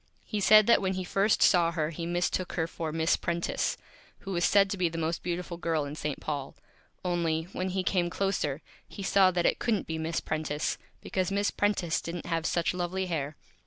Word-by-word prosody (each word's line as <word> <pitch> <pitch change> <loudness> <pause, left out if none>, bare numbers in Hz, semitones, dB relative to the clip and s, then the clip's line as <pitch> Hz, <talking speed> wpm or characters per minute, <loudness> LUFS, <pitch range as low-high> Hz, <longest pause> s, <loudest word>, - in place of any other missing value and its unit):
He 210 - -2
said 215 +1 +7
that 235 - +5
when 190 -1 0
he 185 0 -3
first 195 +4 +2
saw 170 -3 +5
her 155 -1 -1
he 165 +1 -5
Mistook 175 +1 -1
her 165 - 0
for 165 -1 -4
Miss 160 +2 +2
Prentice, 170 0 -1 0.4
who 195 - -6
was 175 -2 0
said 200 +1 +5
to 200 - -2
be 180 -2 +2
the 165 - -6
Most 165 0 -1
Beautiful 175 0 -4
Girl 165 -3 0
in 140 - -6
St. 150 -2 -3
Paul, 145 -3 -4 0.5
only, 165 -3 0
when 185 +1 -2
he 185 0 -1
came 180 -2 +1
closer, 175 -7 -1 0.2
he 200 - -8
saw 190 0 +5
that 175 -1 0
it - - +2
couldn't 225 -4 0
be 160 0 -4
Miss 160 0 -1
Prentice, 155 -1 -2 0.2
because 185 0 -1
Miss 200 +1 +1
Prentice 200 -5 0
didn't 170 0 -6
have 165 -1 -1
such 170 0 +1
Lovely 180 +1 -2
Hair. 155 -4 -3
175 Hz, 205 wpm, -29 LUFS, 160-190 Hz, 0.5 s, said